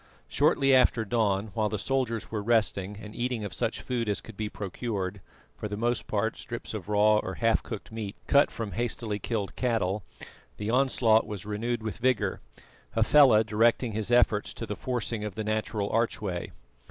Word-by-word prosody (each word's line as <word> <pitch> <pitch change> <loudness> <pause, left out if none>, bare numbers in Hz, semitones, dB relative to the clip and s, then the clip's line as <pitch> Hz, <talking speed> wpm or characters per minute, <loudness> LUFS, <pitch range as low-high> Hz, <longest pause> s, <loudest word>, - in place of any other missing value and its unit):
Shortly 140 -2 +3
after 125 -3 +4
dawn, 105 -2 0
while 110 -2 0
the 105 - -2
soldiers 120 0 -1
were 110 -2 -2
resting 105 -3 +1
and 105 0 -10
eating 120 -2 -2
of 100 -4 -5
such - - -2
food 120 -3 -2
as 105 - 0
could 115 - -12
be 105 +1 -3
procured 100 -2 -4 0.3
for - - -5
the 105 0 -5
most 120 +1 0
part 110 +1 -1
strips 120 -1 -6
of 105 -2 -6
raw 105 +1 +4
or 95 -3 -3
half 115 -1 +2
cooked 110 -2 -7
meat 110 -3 -5
cut 140 0 +5
from 110 -3 -5
hastily 110 +1 -2
killed 105 -4 -3
cattle 110 -5 0 0.6
the 105 +1 -2
onslaught 120 -4 +3
was 100 -2 -6
renewed 115 +2 -2
with 110 0 -4
vigour, 125 -2 +1 0.5
Hafela 130 -7 +6
directing 115 +2 +2
his 110 +1 -2
efforts 115 -4 +3
to 115 - -5
the 105 - -4
forcing 120 -3 -2
of 105 -3 -5
the 110 - -3
natural 110 -1 -1
archway. 105 -6 -1
110 Hz, 175 wpm, -28 LUFS, 105-120 Hz, 0.6 s, Hafela